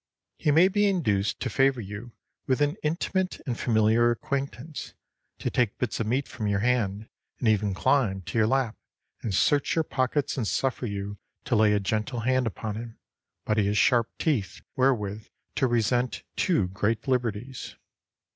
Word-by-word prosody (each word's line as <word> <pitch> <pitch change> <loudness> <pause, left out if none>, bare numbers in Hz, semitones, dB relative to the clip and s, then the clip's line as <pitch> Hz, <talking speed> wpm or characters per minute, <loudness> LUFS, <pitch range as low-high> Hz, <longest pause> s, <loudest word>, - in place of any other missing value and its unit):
He - - +1
may 160 +5 +6
be 205 +1 +2
induced 110 - +1
to 130 - -1
favor 135 +2 +3
you 105 +3 -7 0.4
with 130 0 +2
intimate 165 +5 -1
and 125 - -2
familiar 115 0 +3
acquaintance, 140 +4 -4 0.4
to - - -3
take 120 -4 +1
bits 125 - -2
of 115 - -1
meat 130 +5 0
from 110 -3 -4
your 100 -1 +1
hand 110 -3 0 0.3
and 120 - -1
even 105 -2 +2
to - - -11
climb 125 -8 +2
to 115 - -2
your 110 - +4
lap 130 -2 +1 0.5
and 115 - -3
search 140 +9 +2
your 165 - +2
pockets 135 0 -1
and 115 -5 -1
suffer 130 +1 -1
you 100 0 -5 0.3
to - - +1
lay 105 -1 +5
a 105 - +3
gentle 110 +4 -2
hand 130 +1 +2
upon 110 0 -4
him, 115 0 -8 0.5
but 105 0 +1
he 100 - +2
has 105 +1 +1
sharp 120 -1 +4
teeth 115 - -1
wherewith 110 -6 0 0.3
to 135 - +2
resent 120 +1 0
too 135 - +1
great 105 +5 -1
liberties. 125 -1 -2
120 Hz, 170 wpm, -27 LUFS, 105-135 Hz, 0.5 s, may